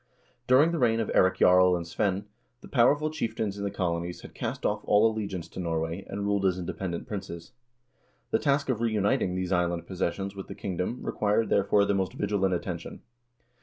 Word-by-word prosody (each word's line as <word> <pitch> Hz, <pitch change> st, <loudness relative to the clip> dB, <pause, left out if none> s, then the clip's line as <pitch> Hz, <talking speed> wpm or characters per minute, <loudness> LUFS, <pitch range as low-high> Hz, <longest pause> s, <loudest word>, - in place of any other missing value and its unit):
During 140 Hz, +6 st, +5 dB
the 170 Hz, -, -1 dB
reign 115 Hz, -3 st, +3 dB
of 110 Hz, -, -1 dB
Eirik 95 Hz, 0 st, +4 dB
Jarl 90 Hz, 0 st, +5 dB
and 85 Hz, -1 st, -3 dB
Svein, 95 Hz, +3 st, -1 dB, 0.4 s
the -, -, -12 dB
powerful 145 Hz, +5 st, +3 dB
chieftains 110 Hz, -8 st, -3 dB
in -, -, -3 dB
the 100 Hz, -, -1 dB
colonies 85 Hz, -2 st, -3 dB
had -, -, -12 dB
cast -, -, -4 dB
off -, -, 0 dB
all 105 Hz, +1 st, +4 dB
allegiance 100 Hz, -6 st, -2 dB
to -, -, -9 dB
Norway, 85 Hz, +1 st, -2 dB
and 100 Hz, +1 st, -4 dB
ruled 100 Hz, -1 st, +1 dB
as 90 Hz, -1 st, 0 dB
independent 90 Hz, 0 st, -4 dB
princes. 85 Hz, -5 st, -6 dB, 0.8 s
The -, -, +3 dB
task 140 Hz, -1 st, +1 dB
of 120 Hz, -3 st, 0 dB
reuniting 105 Hz, -5 st, +1 dB
these 95 Hz, 0 st, -2 dB
island 85 Hz, -1 st, 0 dB
possessions 95 Hz, +2 st, -3 dB
with 95 Hz, -, -7 dB
the -, -, -8 dB
kingdom 95 Hz, +6 st, -3 dB
required, 105 Hz, +2 st, 0 dB
therefore, 100 Hz, +1 st, +3 dB
the 100 Hz, -, +1 dB
most 95 Hz, -1 st, -1 dB
vigilant 95 Hz, -3 st, 0 dB
attention. 85 Hz, -1 st, -6 dB
95 Hz, 185 wpm, -28 LUFS, 90-110 Hz, 0.8 s, During